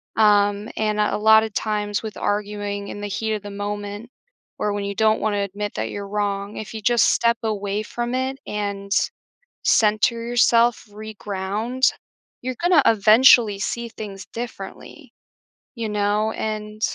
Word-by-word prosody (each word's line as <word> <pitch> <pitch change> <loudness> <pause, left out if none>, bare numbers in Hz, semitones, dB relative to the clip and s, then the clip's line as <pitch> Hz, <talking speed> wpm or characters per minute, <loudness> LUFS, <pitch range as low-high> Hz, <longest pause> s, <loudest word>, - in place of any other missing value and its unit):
um, 205 0 +3
and 215 -1 0
at 210 - +2
a - - 0
lot 220 +1 +6
of 220 - -5
times 210 -1 -1
with 220 -1 -6
arguing 205 -1 -2
in 205 - -7
the 205 - -3
heat 220 +2 -2
of 210 - -3
the 205 - -7
moment, 205 +2 -5 0.5
or 210 - 0
when 205 -1 -3
you 200 - -3
don't 220 0 +3
wanna 210 -1 0
admit 205 +1 -4
that 110 +1 -2
you're 200 -1 -6
wrong, 200 0 -2
if 215 - -7
you 220 - -6
just 240 +2 +3
step 235 0 +2
away 205 -1 -2
from 240 +2 -4
it 260 +1 -1
and 200 -1 -4 0.7
center 215 +2 +3
yourself, 240 0 +3
reground, 215 +3 -2 0.5
you're 255 -1 -4
gonna 350 -3 +5
eventually 220 0 +6
see 235 +3 -3
things 200 -4 -8
differently, 235 +6 -8 0.6
you 230 -2 -3
know, 210 +1 +1
and 215 0 -5
210 Hz, 155 wpm, -22 LUFS, 205-225 Hz, 0.7 s, lot